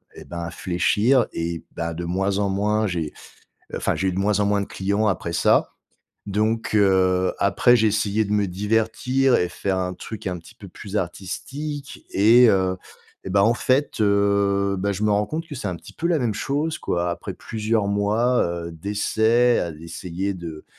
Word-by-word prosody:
et - - -11
ben, 85 -1 -7
à 85 0 -4
fléchir 105 +9 +2
et 85 0 -4
bah, 85 0 -3
de 85 +2 -5
moins 95 +3 0
en 100 -1 +1
moins 105 +2 +1
j'ai, 85 -4 -3 0.6
enfin, - - 0
j'ai 95 - -1
eu - - 0
de 95 - -3
moins 105 +1 +1
en - - +3
moins 100 0 +2
de 100 - -3
clients 100 +3 -1
après 85 -3 -2
ça. 85 - +3 0.6
Donc, 110 +2 -1
heu, 95 -2 +3
après 120 +5 +4
j'ai 110 -1 +3
essayé 105 +1 +1
de 105 - -3
me 105 -1 +2
divertir 110 +7 +1
et 90 - +1
faire 95 +2 -2
un 90 0 -2
truc 110 +2 -8
un 90 -1 -2
petit 85 - -16
peu 100 - -12
plus 100 +3 -7
artistique 135 - -6
et 115 +4 +6
heu 95 -1 +1 0.5
et 95 - -5
ben, 100 +1 +3
en 115 +3 +4
fait, 130 -2 0
heu, 100 -1 +2
bah, 100 +1 0
je 100 +3 -2
me 105 - +3
rends 105 0 +1
compte 160 +5 -4
que 150 - -8
c'est 105 -6 -4
un 90 - -3
petit - - -14
peu 170 - -2
la 165 -3 +2
même 115 -5 -1
chose 150 +7 -2
quoi. 85 0 -1
Après 85 - -5
plusieurs 110 -1 -1
mois, 105 +5 +2
heu, 85 -1 -4
d'essais 110 +6 +2
à 85 - -2
essayer 90 +4 -4
de 85 -3 -8
100 Hz, 195 wpm, -23 LUFS, 90-110 Hz, 0.6 s, et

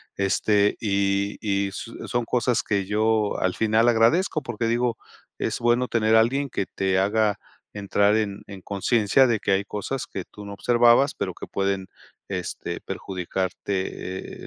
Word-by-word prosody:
este, 100 +1 +2
y 100 -1 0
y 100 -1 0
s 115 +4 -7 0.2
son 120 -1 0
cosas 120 0 +1
que 100 -3 -1
yo 110 +1 +1
al 95 0 0
final 110 +1 +3
agradezco 150 +9 +3
porque 120 -3 -3
digo, 120 0 0 0.4
es - - -2
bueno 120 +1 +2
tener 110 -1 +2
a 110 - +7
alguien 135 +4 0
que 100 - -2
te 95 0 -1
haga 105 +2 +2 0.4
entrar 100 0 +2
en 105 -2 -2
en 100 -2 -9
conciencia 110 +6 +2
de 115 -3 +1
que - - -1
hay 95 +1 +2
cosas 110 +6 -4
que 95 - -5
tú 105 - -12
no 100 - -7
observabas, 120 +5 +4
pero - - -3
que - - -9
pueden, 95 -1 -1 0.4
este, - - -4
perjudicarte, 95 0 -4
105 Hz, 160 wpm, -24 LUFS, 100-120 Hz, 0.4 s, a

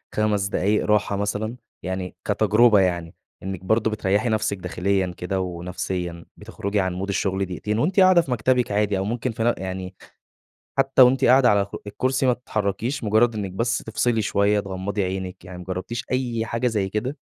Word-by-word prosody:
5 105 -2 +1
دقايق 100 +1 +1
راحة 105 -1 +2
مثلًا؟ 105 +3 -2 0.3
يعني 95 0 -4
كتجربة 110 -1 +4
يعني، 85 -3 0 0.3
إنِك 95 -2 -5
برضه 110 +2 +2
بتريحي 105 +2 0
نفسِك 110 -2 0
داخليًا 95 +1 -1
كده 95 +2 -2
ونفسيًا 90 -1 -4
بتخرجي 100 +1 -3
عن 95 -2 0
مود 95 +2 -4
الشغل 95 0 0
دقيقتين 100 +4 -3
وأنتِ 180 - +1
قاعدة 185 -2 +7
في 135 - -7
مكتبِك 125 0 +1
عادي 105 -1 +1
أو 95 - -1
ممكن 120 +2 -2
في 115 0 -3
نف 120 - +3
يعني 95 0 -5 0.8
حتى 135 -1 +4
و 125 - +10
أنتِ 130 +1 +2
قاعدة 125 0 +6
على 100 -1 +3
خ 100 - -10
الكرسي 130 +5 0
ما 125 - +4
تتحركيش، 115 +3 -3
مجرد 110 +2 +3
إنِك 100 -3 -3
بس 115 +5 0
تفصلي 115 0 0
شوية، 105 0 +2
تغمضي 100 +1 -3
عينِك، 95 0 -5
يعني 90 0 -9
ما 90 - -8
جربتيش 95 +6 -4
أي 120 -3 -1
حاجة 115 +2 -1
زي 105 -5 -1
كده؟ 125 +8 -3
105 Hz, 180 wpm, -23 LUFS, 95-115 Hz, 0.8 s, و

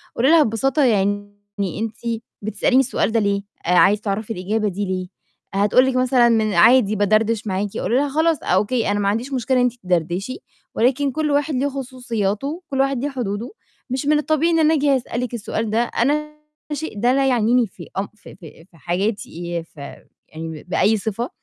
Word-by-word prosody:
قُولي 255 +4 +2
لها 325 -1 +6
ببساطة 270 +5 +1
يعني: 205 -3 +1 0.2
"أنتِ 210 +4 -3 0.4
بتسأليني 220 +5 +1
السؤال 260 -3 0
ده 225 - +2
ليه؟ 200 -1 0 0.2
عايزة 190 +4 +4
تعرفي 215 +2 -3
الإجابة 210 +3 -1
دي 200 +1 -2
ليه؟" 185 -1 -3 0.5
هتقول 205 +6 +4
لِك 265 -1 0
مثلًا: 255 -1 +4
"من 220 -3 +2
عادي 215 +4 +5
بادردش 215 +2 +1
معاكِ." 195 +1 -2
قولي 240 - -1
لها: 285 +2 +2
"خلاص، 320 +3 +2
okay، 210 +6 +1
أنا 205 0 0
ما 200 0 +1
عنديش 235 +6 -2
مشكلة 255 0 0
إن 250 - +3
أنتِ 245 - +1
تدردشي، 180 +6 -1 0.4
ولكن 270 +4 +2
كل 300 +2 -1
واحد 290 +1 +1
ليه 270 +3 +1
خصوصياته، 255 - -3
كل 270 - -2
واحد 270 -2 +1
ليه 290 - 0
حدوده. 235 - -4 0.4
مش 260 +3 -2
من 300 +1 +3
الطبيعي 310 +2 +1
إن 330 - +2
أنا 315 0 +4
آجي 285 -2 +3
أسألِك 245 -1 -4
السؤال 220 -1 -3
ده، 225 +3 +2
أنا 295 +6 -1 0.4
الشيء 295 -7 -4
ده 245 +2 +3
لا 270 0 +2
يعنيني 240 -1 +3
في - - -12
أم 195 - -2
في 215 - -14
في 165 -2 -14
في 165 - -20
حياتي، 190 - -2 0.3
ي 165 - -4
في 155 -3 -15 0.5
يعني 160 -1 -7
ب - - -25
بأي 215 +4 +3
صفة، 220 +4 -3
230 Hz, 190 wpm, -21 LUFS, 200-270 Hz, 0.5 s, لها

